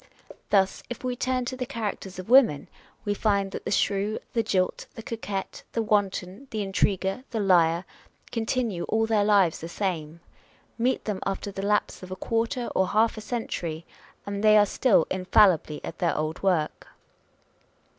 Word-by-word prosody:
Thus, 195 -2 +2
if 245 - -7
we 250 -1 -1
turn 255 0 -1
to 255 - -4
the 250 -1 -4
characters 205 -5 -4
of 185 - -7
women, 235 - +5 0.4
we 205 - +1
find 200 -2 +1
that - - -7
the - - -2
shrew, 200 +1 +1 0.2
the 230 - +2
jilt, 185 -4 -1
the 225 - -8
coquette,. 205 -4 -5
the 230 - 0
wanton, 205 +2 -1
the 215 -2 -2
intriguer, 195 +3 0
the 225 - -3
liar, 175 -3 +3 0.5
continue 230 -5 -1
all 225 0 +1
their 220 -2 +2
lives 200 -5 +3
the 165 - -7
same. 170 -4 -3 0.6
Meet 245 +3 0
them 210 -3 -2
after 195 +1 -3
the 195 - -5
lapse 205 +1 0
of 185 - -9
a 185 - -4
quarter 230 +5 -1
or 190 - +2
half 220 +3 +2
a 215 - -7
century, 170 -8 -4 0.4
and 200 +1 -4
they 215 0 +7
are 205 - +6
still 205 -4 +3
infallibly 185 -4 +3
at - - -8
their 170 -3 +1
old 155 +1 -2
work. 175 -6 0
200 Hz, 170 wpm, -26 LUFS, 185-225 Hz, 0.6 s, they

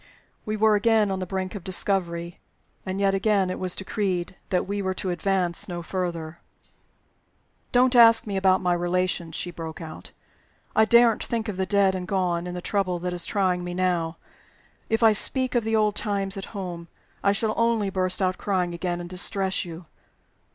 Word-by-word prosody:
We 215 0 -1
were 215 0 +4
again 210 -1 +3
on 190 - -2
the 185 - -4
brink 185 0 -3
of 200 -4 -7
discovery. 175 -2 -1 0.5
And 190 +1 -3
again 195 -1 +2
it - - -5
was 185 -1 0
decreed 190 -3 -2
that 180 - +1
we 200 +1 -2
were 190 -1 -2
to 185 0 -2
advance 175 0 -1
no 175 -2 -5
further. 170 -3 -4 1.3
"Don't 250 +1 +4
ask 230 -1 +7
me 205 -2 -4
about 190 -1 +3
my 180 -1 +2
relations!" 175 -1 -1
she 175 - -4
broke 160 -2 -7
out. 160 -1 -9 0.7
"I 220 - +5
daren't 235 -1 +5
think 230 -1 -2
of 210 - -3
the 190 0 -2
dead 200 0 +3
and 180 -1 -4
gone, 180 -3 0
in 180 - -5
the 180 - -6
trouble 195 -3 0
that 180 +1 -3
is 175 -1 -4
trying 185 -3 0
me 175 0 -5
now. 175 -3 0 0.7
If 225 +1 +1
I 220 -1 +7
speak 255 +4 +1
of 240 -2 +2
the 225 0 0
old 215 -1 +2
times 200 -2 -1
at 195 - -5
home, 175 -3 -6 0.4
I 200 - +4
shall 215 +2 0
only 230 -4 +1
burst 185 0 0
out 185 0 0
crying 180 -3 -1
again, 175 0 -3
and 175 - -7
distress 190 +1 0
you. 170 0 -9
190 Hz, 185 wpm, -25 LUFS, 175-205 Hz, 1.3 s, ask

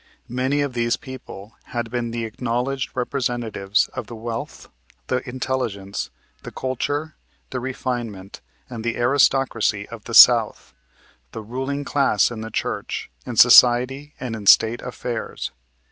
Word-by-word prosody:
Many 130 +3 0
of 140 -3 -2
these 120 -1 0
people 115 -5 -10
had 120 -1 -4
been 120 -1 -2
the 115 0 -3
acknowledged 125 +4 -2
representatives 120 -6 -1
of - - -7
the 120 - -8
wealth, 115 +1 -6 0.4
the 125 -1 +1
intelligence, 120 -6 -3 0.3
the - - -8
culture, 145 +4 -3 0.3
the 130 - -2
refinement 120 -6 -5 0.3
and 115 -3 -7
the 120 0 -2
aristocracy 120 -5 +2
of 115 -2 -10
the 115 - -4
South, 115 -3 +6 0.6
the 110 - -6
ruling 135 +5 -4
class 135 -7 +2
in 110 -2 -6
the 110 - -6
church, 105 - -4 0.2
in - - -4
society 130 +4 +6
and 125 -3 -4
in 105 -2 -7
State 115 +4 +6
affairs. 120 -2 -5
120 Hz, 135 wpm, -22 LUFS, 115-130 Hz, 0.6 s, South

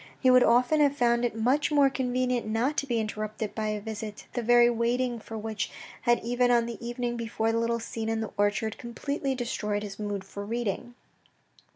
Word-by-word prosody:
He 255 - +5
would 255 0 +7
often 245 +7 +4
have 285 -1 +3
found 235 -1 +3
it 235 - -2
much 255 +7 +2
more 285 -2 +5
convenient 250 -2 0
not 230 +7 0
to 280 - 0
be 240 -3 +1
interrupted 215 0 -3
by 220 -1 -2
a 215 0 -1
visit, 210 0 -6
the 245 - -1
very 240 +1 +6
waiting 240 +1 0
for 225 0 -8
which 215 -1 -3 0.3
had 240 0 +3
even 245 +1 +2
on 240 -1 +4
the 235 0 -7
evening 240 0 -3
before 225 -1 -1
the 230 - +1
little 235 0 0
scene 225 -1 -4
in 225 0 0
the 220 - -4
orchard 205 +2 0
complexly 270 +3 -3
destroyed 210 -4 -2
his 200 -1 -7
mood 205 -2 -3
for 200 +1 -7
reading. 235 +2 -3
235 Hz, 200 wpm, -28 LUFS, 220-245 Hz, 0.3 s, would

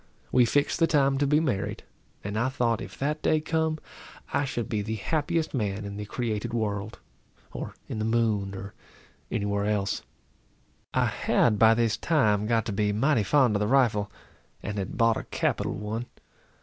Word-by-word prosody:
We 125 -1 +5
fixed 145 +7 +1
the 165 - +4
time 140 -3 +3
to 145 - +2
be 150 +2 +4
married; 130 -12 -2 0.4
and 100 +1 -4
I 120 +4 +1
thought 120 -4 0
if - - -8
that 150 +2 -1
day 155 - +3
come, 160 0 0 0.6
I 140 0 +2
should 120 -3 -3
be 105 -2 -1
the 110 +2 -3
happiest 160 - -1
man 105 -5 -2
in 100 0 -6
the 105 0 -5
created 115 +1 -3
world, 105 -1 -2 0.5
or - - -6
in 110 - -4
the 110 - -1
moon, 110 -4 +1
or 95 +1 -7 0.6
any 105 -3 -1
where 100 0 0
else. 100 -2 0 0.9
I - - +2
had 105 -4 +2
by 115 0 +7
this 115 -1 +1
time 105 -10 +2
got 115 -1 +2
to 110 - -3
be 105 0 +1
mighty 120 +4 +2
fond 120 +2 +3
of - - +2
the 105 - +1
rifle, 110 -5 +2 0.5
and 105 0 -3
had 95 - -4
bought 115 -2 +4
a - - -4
capital - - -1
one. 110 +3 -4
115 Hz, 185 wpm, -27 LUFS, 105-135 Hz, 0.9 s, by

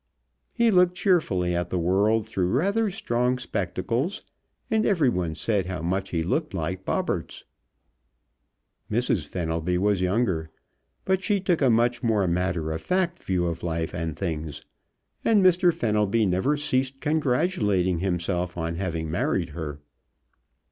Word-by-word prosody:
He 235 -2 +4
looked 180 -2 +4
cheerfully 105 - +2
at 85 0 -2
the 90 - -1
world 100 +5 +2
through 90 -2 -1
rather 200 - +1
strong 125 -8 0
spectacles, 115 - -2 0.5
and 220 -1 +3
everyone 120 - +1
said 95 +2 0
how 90 -3 -4
much 95 +3 -1
he 85 -2 -1
looked 150 - -1
like 90 +4 -3
Bobberts. - - -2 1.4
Mrs. 110 -8 0
Fenelby 85 +1 -1
was 100 0 +1
younger, 90 -4 0 0.6
but 190 0 +1
she 205 0 +2
took 180 -3 0
a 135 - +4
much 120 +1 +2
more 110 -5 +2
matter 85 -2 -1
of 80 +1 -3
fact 180 -1 0
view 90 -2 0
of 85 -1 -3
life 80 -1 -2
and 80 -3 -3
things, 80 -5 -4 0.6
and 210 -4 +4
Mr. 180 0 +5
Fenelby 105 - +1
never 95 +11 +1
ceased 135 -2 0
congratulating 125 - +1
himself 90 -1 -1
on 85 0 -2
having 80 -4 -3
married 85 0 0
her. 75 -2 -6
95 Hz, 140 wpm, -25 LUFS, 85-140 Hz, 1.4 s, Mr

